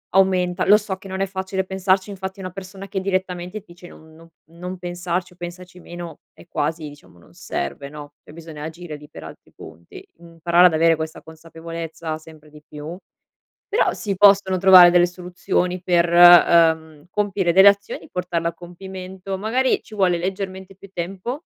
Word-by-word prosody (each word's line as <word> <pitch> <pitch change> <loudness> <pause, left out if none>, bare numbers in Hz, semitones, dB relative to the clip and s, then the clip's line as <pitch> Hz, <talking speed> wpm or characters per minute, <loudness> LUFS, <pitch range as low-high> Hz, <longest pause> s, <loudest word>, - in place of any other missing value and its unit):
aumenta 185 -2 +2
lo 205 - +7
so 210 -2 -5
che 195 - -13
non 190 0 -5
è 195 - 0
facile 190 0 -4
pensarci, 190 +1 0
infatti 190 0 -7
una 185 -1 -6
persona 195 +1 -10
che 195 - -3
direttamente 185 0 -3
ti 190 -4 -17
dice: 175 0 -14
"Non 160 0 -17
non 165 +1 -17 0.3
non 180 +2 -6
pensarci, 175 0 -4
o - - -24
pensaci 180 +1 -10
meno" 175 -3 -9 0.2
è - - -18
quasi 155 -1 -3
diciamo 145 -11 -18
non 85 - -21
serve 140 - -5
no. 145 0 -11
E - - -15
bisogna 160 -2 -10
agire 160 0 -8
lì 150 0 -13
per 80 - -11
altri 80 - -13
punti, 80 +1 -13
imparare 170 +1 +2
ad 175 - -1
avere 165 +1 +3
questa 160 0 -6
consapevolezza, 165 0 -8
sempre 155 -1 -16
di 150 0 -16
più. 150 +3 -8 0.7
Però 430 +2 +1
si 200 -3 -4
possono 195 -1 +5
trovare 185 -1 +8
delle 175 0 +5
soluzioni 180 0 -3
per, 175 -1 +2
uhm, 165 -3 +6
compiere 195 -3 -1
delle 190 +3 +8
azioni, 200 0 -3
portarle 175 -2 -2
a - - -9
compimento, 185 +2 -8
magari 245 +6 0
ci 215 - -14
vuole 185 -4 +2
leggermente 190 +1 -5
più 200 +1 -15
tempo 195 - -5
180 Hz, 175 wpm, -21 LUFS, 165-190 Hz, 0.7 s, trovare